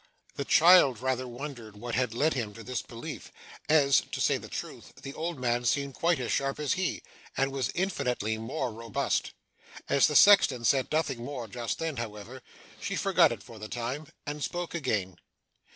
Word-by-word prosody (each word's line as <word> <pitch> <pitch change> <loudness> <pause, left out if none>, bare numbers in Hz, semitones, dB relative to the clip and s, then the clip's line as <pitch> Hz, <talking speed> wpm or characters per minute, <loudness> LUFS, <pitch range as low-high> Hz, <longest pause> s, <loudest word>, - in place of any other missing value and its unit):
The 140 - -3
child 160 - +6
rather 130 0 -1
wondered 120 -4 -8
what 120 +3 -6
had 125 -2 0
led 155 +6 +2
him 110 -6 -4
to 115 - -9
this 125 +2 -3
belief, 115 0 -8 0.4
as, 140 -3 +5
to - - -4
say - - +2
the - - -10
truth, - - -7
the 135 - -6
old 165 +1 -4
man 120 -1 0
seemed 140 +3 0
quite 170 +2 +1
as 125 - -3
sharp 135 +1 -1
as 150 -3 +1
he, 185 -1 -2 0.3
and 135 0 +1
was 135 -2 -1
infinitely 125 - -1
more 125 +1 -3
robust. 115 -1 -2 0.5
As 140 -1 +4
the 150 - -2
sexton 140 -13 +6
said 135 +2 +2
nothing 140 -6 -1
more 125 -3 -5
just 115 +2 -4
then, 160 -4 -3
however, 115 +2 -7 0.4
she - - -3
forgot - - +4
it - - -6
for 115 -2 -12
the 105 0 -7
time, 125 +5 -4 0.2
and 145 0 -4
spoke 175 -1 -3
again. 105 - -2
130 Hz, 185 wpm, -29 LUFS, 115-150 Hz, 0.5 s, child